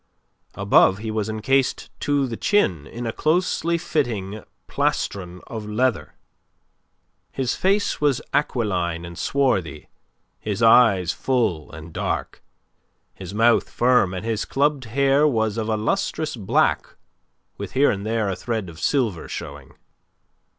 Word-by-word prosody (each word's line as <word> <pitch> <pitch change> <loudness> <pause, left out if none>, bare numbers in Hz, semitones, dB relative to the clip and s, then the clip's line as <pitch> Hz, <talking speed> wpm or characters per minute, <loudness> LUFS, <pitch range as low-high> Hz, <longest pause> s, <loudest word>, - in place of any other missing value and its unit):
Above 95 - +4
he 110 +1 -5
was 110 -1 -2
encased 125 +5 0
to 145 -1 +1
the 120 -3 -4
chin 95 - +1
in 120 - -7
a 115 - -1
closely 170 +1 +1
fitting 110 - -2 0.2
plastron 90 -2 -2
of 110 -2 -7
leather. 120 0 -1 1.2
His 130 -2 -1
face 200 -1 0
was 145 -4 +2
aquiline 90 - -1
and 85 0 -9
swarthy, 100 - -1 0.5
his 105 +1 -3
eyes 110 -7 +5
full 110 - -1
and 80 0 -10
dark, - - -3 0.7
his 95 +1 -9
mouth 115 +2 +3
firm 120 -7 +2
and 95 +3 -5
his 110 -2 -1
clubbed 140 -1 0
hair 140 +5 +3
was 110 -6 0
of 110 -1 -3
a 110 - +1
lustrous 155 - -1
black 105 -5 0 0.6
with - - -6
here 140 +2 +4
and 100 -1 -4
there 110 -1 -1
a 95 - -1
thread 110 -5 -3
of 80 -1 -12
silver 110 - 0
showing. - - -8
115 Hz, 135 wpm, -23 LUFS, 95-135 Hz, 1.2 s, eyes